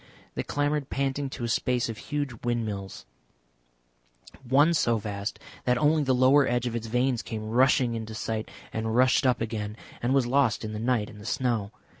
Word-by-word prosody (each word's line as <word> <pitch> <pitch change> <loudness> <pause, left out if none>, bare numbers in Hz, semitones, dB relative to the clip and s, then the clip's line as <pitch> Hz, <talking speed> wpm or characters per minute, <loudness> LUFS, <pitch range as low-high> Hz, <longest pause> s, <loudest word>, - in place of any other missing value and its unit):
They - - -2
clambered 145 -1 -1
panting 140 0 -1
to 130 - -7
a - - 0
space 125 +1 +1
of 115 -2 -6
huge 145 -6 -4
windmills, 110 - -3 1.4
one 140 +6 +4
so 120 -7 +2
vast 100 0 -4 0.3
that 125 0 +3
only 155 +2 +3
the 130 -2 +2
lower 130 +2 +5
edge 120 0 0
of 120 -1 -2
its 115 -1 -3
vanes 125 +1 +1
came 110 -1 -5
rushing 125 0 +4
into 110 -1 -5
sight 110 0 -3 0.2
and 110 0 -2
rushed 130 +2 +4
up 125 -3 +2
again 110 -1 -3 0.2
and 120 - 0
was 135 -3 +3
lost 125 -3 +2
in 110 - -5
the 105 - -4
night 115 -2 +1
and 105 - -12
the - - -11
snow. 115 -6 0
120 Hz, 185 wpm, -27 LUFS, 110-135 Hz, 1.4 s, lower